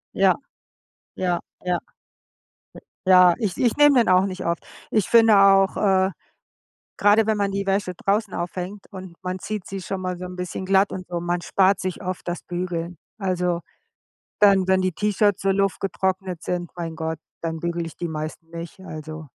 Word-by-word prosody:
Ja. 190 -1 +4 0.8
Ja, 180 -2 -1 0.2
ja. 180 -1 +1 1.3
J - - +2
ja, 180 -1 +7
ich 210 -6 -2
ich 240 -3 +2
nehme 290 -3 +6
den 230 - +3
auch 185 +1 +5
nicht 185 -1 -5
oft, 170 0 -1 0.3
ich 215 -4 +1
finde 225 -3 +6
auch, 195 -1 +5
äh, 190 -2 +3 0.9
grade 205 +2 +4
wenn 220 -1 +2
man 200 -1 0
die 195 0 -3
Wäsche 195 -1 0
draußen 200 +2 0
aufhängt 180 +3 -5
und 185 -2 -9
man 185 0 -3
zieht 210 -3 -5
sie 195 0 -5
schon 190 +1 -4
mal 185 -1 -3
so 180 - -6
'n 180 0 -7
bisschen 180 +1 -5
glatt 195 +1 +3
und 185 -1 -6
so, 175 -1 -3
man 175 0 -1
spart 195 0 +3
sich 185 +2 -4
oft 185 0 -4
das 175 - -3
Bügeln. 175 -1 -4 0.2
Also, 180 -3 0 0.8
dann, 195 -2 +5
wenn 190 0 +4
die 185 -1 0
T-Shirts 205 0 +1
so 195 - +2
luftgetrocknet 190 -2 -1
sind, 175 -1 -3
mein 165 -2 -5
Gott, 160 -1 -3 0.2
dann 165 -1 -4
bügel 170 0 -2
ich 165 - -10
die 175 - -4
meisten 155 +1 -6
nicht, 170 +1 -8
also. 155 -3 -8
185 Hz, 180 wpm, -23 LUFS, 175-195 Hz, 1.3 s, ja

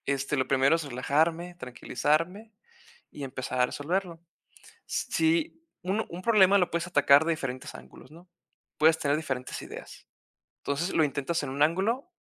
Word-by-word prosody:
Este, 140 +1 -1
lo 130 - 0
primero 135 +3 +3
es 165 - -2
relajarme, 160 +6 0
tranquilizarme 165 - -2 0.6
y 145 - -7
empezar 130 -1 -4
a 125 - +5
resolverlo. 170 +5 -3 0.7
S - - -2
si 325 0 0 0.2
un 195 +5 -1
un 175 +2 -8
problema 200 -2 +5
lo 180 - +1
puedes 170 0 -2
atacar 145 -3 +5
de 165 - +1
diferentes 135 -5 -5
ángulos, 65 - -14
¿no? 170 +4 -16 0.5
Puedes 160 +1 +5
tener 145 -2 +1
diferentes 135 -5 -4
ideas. - - -11 0.5
Entonces, 150 +6 -2
lo 160 - +4
intentas 145 +3 -2
en 140 - -4
un 140 +2 -1
ángulo, 205 - +1
160 Hz, 155 wpm, -28 LUFS, 140-180 Hz, 0.7 s, a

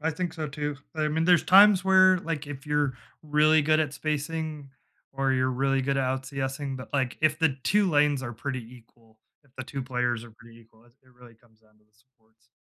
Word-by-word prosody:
I 160 +2 -1
think 170 +2 -4
so, 155 -1 -4
too, 145 0 -4 0.2
I 155 -1 -1
mean, 160 +2 -1
there's 180 -1 +4
times 195 0 +6
where, 185 -1 +5
like, 160 -5 -5
if 140 -1 -9
you're 150 -2 0 0.3
really 155 +1 +3
good 155 +1 +2
at 150 -2 -2
spacing 155 -1 -4 0.4
or 135 0 0
you're 130 0 +1
really 135 +1 0
good 135 +1 -1
at 135 - 0
out 130 +1 -2
CSing, 135 0 -4
but, 130 - -9
like, 130 -3 -1
if 155 -1 +2
the 160 -5 +1
2 205 -3 +2
lanes 145 -2 +2
are 120 -2 -5
pretty 130 +3 -5
equal, 115 -2 -22 0.3
if 140 - -28
the 130 - -6
2 135 +2 -6
players 125 -2 -2
are 120 - -14
pretty 115 +1 -18
equal, 110 0 -24
it 120 - -25
it 130 -1 -25
really 120 -2 -17
comes 110 -1 -29
down 110 -1 -30
to 105 - -33
the 105 - -41
supports. 115 -1 -35
135 Hz, 225 wpm, -26 LUFS, 125-155 Hz, 0.4 s, times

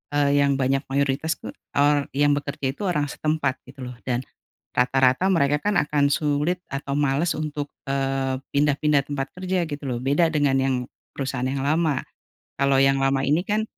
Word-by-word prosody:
eee, 145 0 +3
yang 140 -1 +3
banyak 135 0 +1
mayoritas 140 +3 0
tuh, - - -8 0.2
eee, 145 0 +3
yang 145 0 +4
bekerja 140 -2 -1
itu 140 - -13
orang 150 -5 0
setempat 150 -4 -1
gitu 130 0 -10
loh, 125 0 -7
dan 125 +1 0 0.5
rata-rata 130 +6 +3
mereka 145 -4 +2
kan 205 +3 0
akan 145 -1 +2
sulit 150 +4 0
atau 140 0 -3
males 145 +3 +1
untuk, 150 -1 -3 0.2
eee, 135 -1 -1 0.2
pindah-pindah 145 0 +3
tempat 135 -1 -2
kerja 185 -2 -1
gitu 145 -1 -6
loh, 120 -2 -2
beda 145 +5 +2
dengan 145 -3 +2
yang 130 0 +1 0.4
perusahaan 130 -2 -3
yang 135 0 -2
lama. 155 -3 +2 0.6
Kalo 140 -1 +3
yang 135 0 +4
lama 135 0 +2
ini 150 +5 +2
kan 215 +2 0
140 Hz, 170 wpm, -24 LUFS, 135-150 Hz, 0.6 s, yang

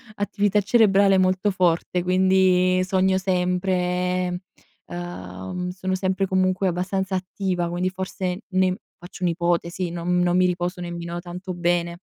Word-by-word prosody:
attività 205 0 +1
cerebrale 200 -2 +4
molto 185 +2 +2
forte 180 -1 +1
quindi 185 0 +3
sogno 190 0 +2
sempre, 180 -1 0 0.5
uhm, 175 - -6
sono 185 +1 -2
sempre 190 +1 0
comunque 185 0 +1
abbastanza 190 +2 -1
attiva 185 -1 -2
quindi 175 +2 -1
forse 185 +1 -4
ne 185 -1 +1 0.2
faccio 175 +1 -10
un'ipotesi 170 +1 0
non 175 +1 0
non 180 0 +2
mi 185 - +4
riposo 180 +1 -2
nemmeno 170 0 -5
tanto 180 +1 -7
bene. 175 0 0
180 Hz, 125 wpm, -23 LUFS, 175-190 Hz, 0.5 s, cerebrale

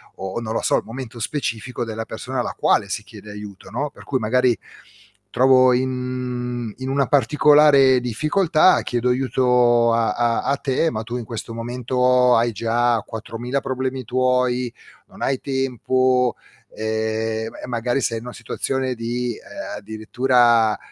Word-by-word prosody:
o 95 +4 -5
non 110 -1 -4
lo - - -1
so, - - +2
il - - -3
momento 120 0 -8
specifico 120 -1 -3
della 115 -1 -5
persona - - -5
alla - - -2
quale - - +2
si - - -3
chiede 105 - -12
aiuto, 105 -2 -10
no, 145 +1 -2
per - - -15
cui 130 - -1
magari 125 +1 +2 0.7
trovo 130 0 +5
in 125 -2 -3
in 130 0 -5
una 135 -1 +1
particolare 145 0 +5
difficoltà, 155 - +2
chiedo 120 0 -1
aiuto 125 -2 +3
a 115 -1 +2
a 120 0 +1
a 140 - +1
te, 140 +4 0
ma 110 -1 -4
tu 120 +2 -5
in 120 - -6
questo 115 0 -6
momento 125 +1 +2
hai 115 +1 +2
già 115 +2 +1
4000 120 +4 -4
problemi 130 0 -3
tuoi, 125 0 +1 0.4
non - - -16
hai 135 -1 0
tempo, 130 -1 +1 0.4
ehm, 110 0 -2
m - - -16
e - - -6
magari 120 +2 -1
sei 115 -2 -1
in 115 - -12
una 125 - -7
situazione 130 +2 -3
di, 120 +1 -3
ehm, - - -8
addirittura 115 +1 +2
125 Hz, 155 wpm, -21 LUFS, 115-130 Hz, 0.7 s, trovo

